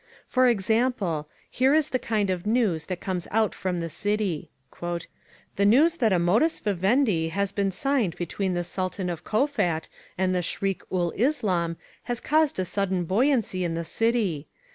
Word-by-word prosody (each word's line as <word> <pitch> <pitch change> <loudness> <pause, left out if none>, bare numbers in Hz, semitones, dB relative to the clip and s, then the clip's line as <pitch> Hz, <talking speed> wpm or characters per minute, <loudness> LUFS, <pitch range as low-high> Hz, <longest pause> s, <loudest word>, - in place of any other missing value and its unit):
For 255 0 +3
example, 205 -7 0 0.2
here 265 +3 +2
is 310 -1 +2
the 255 - 0
kind 210 -5 0
of 185 +2 -3
news 215 -9 +1
that 185 -2 -3
comes 180 -3 -3
out 220 -1 +1
from 180 -2 -2
the 165 - -2
City. 205 -1 -2 0.3
"The 175 -1 -3 0.6
news 310 +10 +5
that 230 -7 +2
a 185 - +4
modus 215 - +2
vivendi 200 -3 +1
has 200 +3 -1
been 200 -1 0
signed 220 - 0
between 180 +2 -2
the 175 - -1
Sultan 185 +1 -3
of 170 - -6
Kowfat 215 - 0 0.3
and 185 0 +1
the 180 - +1
Shriek 195 +2 -2
ul 175 -2 0
Islam 190 - 0 0.3
has 240 -1 -2
caused 310 0 +2
a 185 - 0
sudden 190 -1 -1
buoyancy 215 - +1
in 165 -2 -1
the 170 - -2
City. 210 -6 0
195 Hz, 165 wpm, -26 LUFS, 175-235 Hz, 0.6 s, news